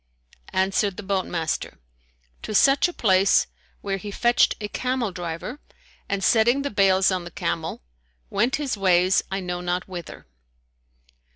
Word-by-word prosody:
Answered 190 +1 +1
the 210 - -6
boat 190 -1 -1
master, 165 -2 -3 0.6
"To 215 - -5
such 275 - +5
a - - -5
place, 195 - +3 0.4
where 195 -1 -2
he 205 +2 -7
fetched 240 +4 +2
a 210 - -4
camel 250 -1 -2
driver 175 - -6 0.5
and, 200 -1 -2
setting 240 +7 +3
the 285 - -3
bales 195 -2 +3
on 185 -1 -2
the 175 - -8
camel, 165 - -4 0.5
went 235 +6 +1
his 285 -5 -2
ways 185 -1 +3
I 195 0 -3
know 180 -1 -4
not 180 +1 -2
whither." 175 -4 -9
195 Hz, 150 wpm, -24 LUFS, 180-220 Hz, 0.6 s, such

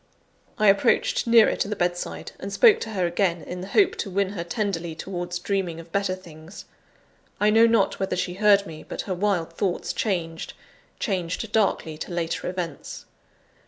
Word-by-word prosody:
I 215 -3 +3
approached 200 +3 +3
nearer 230 -1 +6
to - - -1
the 210 - -3
bedside, 175 -2 -3
and 195 - -6
spoke 410 - +6
to 225 - -5
her 185 -3 0
again, 175 -1 0
in 180 0 -6
the 185 - -6
hope 390 - +3
to 205 - -3
win 195 +1 0
her 190 -4 -4
tenderly 175 -4 -3
towards 175 0 -4
dreaming 180 -2 -2
of 165 0 -12
better 200 -1 0
things. 170 0 -12 0.7
I 210 +1 +4
know 225 +2 +6
not 225 -3 +2
whether 190 -1 -1
she 180 0 -2
heard 200 +1 +4
me, 160 -4 -9
but - - -5
her 190 - -3
wild 180 -3 -1
thoughts 180 0 -2
changed 165 -6 -2 0.5
changed 190 +1 -2
darkly 180 -8 0
to - - -6
later 170 0 -2
events. 175 -5 -6
185 Hz, 175 wpm, -25 LUFS, 170-205 Hz, 0.7 s, nearer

